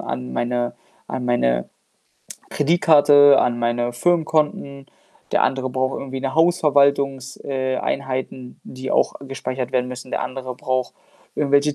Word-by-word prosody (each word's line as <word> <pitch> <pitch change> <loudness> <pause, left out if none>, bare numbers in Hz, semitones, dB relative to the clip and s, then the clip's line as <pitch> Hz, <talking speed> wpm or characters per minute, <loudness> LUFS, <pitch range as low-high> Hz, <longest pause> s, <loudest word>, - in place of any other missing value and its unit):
an 65 -1 -5
meine 120 - -2 0.3
an 130 -1 -4
meine 60 - +1 0.8
Kreditkarte, 145 -3 +5
an 120 -1 0
meine 120 +1 -1
Firmenkonten.“ 155 -2 0 0.5
Der - - +3
andere 130 -1 0
braucht 130 +1 -1
irgendwie 135 -1 -6
'ne 135 0 -3
Hausverwaltungs 140 -5 +2
äh, 130 -1 -2
Einheiten, 130 -2 -4
die 130 0 -7
auch - - +2
gespeichert 130 -2 -5
werden 125 -1 0
müssen. 125 0 -8
Der - - -2
andere 130 -1 -6
braucht 130 0 -2 0.4
irgendwelche 145 0 +2
130 Hz, 130 wpm, -21 LUFS, 125-140 Hz, 0.8 s, Kreditkarte